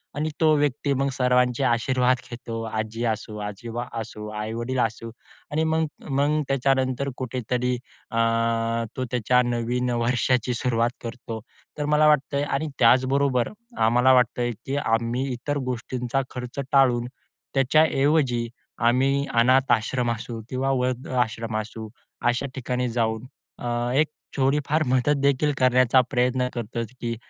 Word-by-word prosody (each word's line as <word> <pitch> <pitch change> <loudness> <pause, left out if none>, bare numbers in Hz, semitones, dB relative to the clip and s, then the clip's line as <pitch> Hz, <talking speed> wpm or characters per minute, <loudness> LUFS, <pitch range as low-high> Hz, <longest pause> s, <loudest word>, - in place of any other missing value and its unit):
आणि 155 +2 -1
तो 155 -1 +5
व्यक्ती 145 -1 0
मग 135 +1 0
सर्वांचे 125 0 +2
आशीर्वाद 125 +1 +2
घेतो. 115 -2 -5
आजी 110 +1 -3
असू, 110 -1 -3
आजोबा 115 +4 -5 0.2
असू, 105 -1 -8
आई-वडील 115 +4 -3
असू 115 0 -1 0.4
आणि 155 +2 +1
मग 160 0 +1 0.2
मग 145 +3 +2
त्याच्यानंतर 135 0 +1
कुठेतरी 125 0 -1 0.4
अ, 115 - -3 0.8
तो 130 - -1
त्याच्या 125 +1 +3
नवीन 120 +1 -1
वर्षाची 120 +1 +1
सुरुवात 120 -1 +1
करतो. 115 -1 -6 0.4
तर 150 - -1
मला 150 +1 +4
वाटतंय 140 -1 +2
आणि 145 +2 -1
त्याचबरोबर 130 +1 +3 0.4
आम्हाला 125 +3 +5
वाटतंय 125 -1 +2
की 135 - -2
आम्ही 120 +1 0
इतर 145 +4 -3
गोष्टींचा 125 +2 -2
खर्च 125 +2 -6
टाळून, 125 -3 +4 0.5
त्याच्याऐवजी 135 -3 +3 0.3
आम्ही 135 +4 +2
अनाथ 130 +2 +4
आश्रम 120 +1 0
असू 115 0 -5
किंवा 135 +1 0
वृद्ध 125 -1 -1
आश्रम 115 -3 -1
असू, 110 0 -8 0.3
अशा 120 +3 +1
ठिकाणी 125 -1 -2
जाऊन 115 0 -1 0.3
अ, 120 - -5 0.3
एक 155 +2 +4 0.3
थोडी 135 +2 +2
फार 155 +2 +2
मदत 130 +3 +2
देखील 140 +1 +2
करण्याचा 130 0 +4
प्रयत्न 125 0 +1
करतो 120 -1 -4 0.2
की 115 -1 -2
125 Hz, 130 wpm, -24 LUFS, 120-135 Hz, 0.8 s, तो